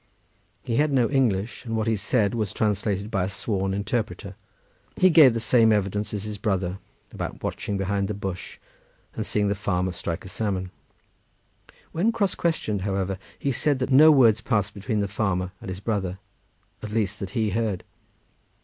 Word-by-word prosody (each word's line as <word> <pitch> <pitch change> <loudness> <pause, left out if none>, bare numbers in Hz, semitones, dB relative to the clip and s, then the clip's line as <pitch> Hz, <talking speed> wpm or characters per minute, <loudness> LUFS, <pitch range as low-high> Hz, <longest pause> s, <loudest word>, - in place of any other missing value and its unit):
He 115 -3 -1
had 150 0 +3
no 125 -3 +2
English, 115 -6 0
and 115 -2 -3
what 110 - 0
he 110 -1 +2
said 105 +1 +1
was 110 -4 -1
translated 105 0 -1
by 95 -3 +1
a - - -3
sworn 95 0 -1
interpreter. 100 0 -3 0.6
He 185 0 +5
gave 145 -8 +7
the - - 0
same 115 0 +4
evidence 105 0 0
as 105 -2 -3
his 105 -1 -6
brother 95 -3 -1 0.3
about - - -6
watching 100 - -3
behind 100 0 -1
the 105 - -3
bush, 95 -2 -6 0.6
and - - -4
seeing 105 -1 +1
the 100 - +2
farmer 95 -2 -1
strike 85 0 -4
a - - -7
salmon. 95 -2 -2 1.2
When 195 +8 +1
cross 205 -5 0
questioned, 110 - -1
however, 95 -1 -2 0.2
he 140 - -1
said 145 +2 +1
that 130 +1 -2
no 150 +4 +8
words 115 -7 +5
passed 105 -5 0
between 105 +1 -2
the 100 - 0
farmer 95 -2 -1
and - - -7
his 95 0 -5
brother, 95 -4 -2 0.6
at 110 - -6
least, 105 -2 -1
that 95 - -4
he 110 -2 +1
heard. 110 -3 -1
105 Hz, 175 wpm, -25 LUFS, 95-115 Hz, 1.2 s, no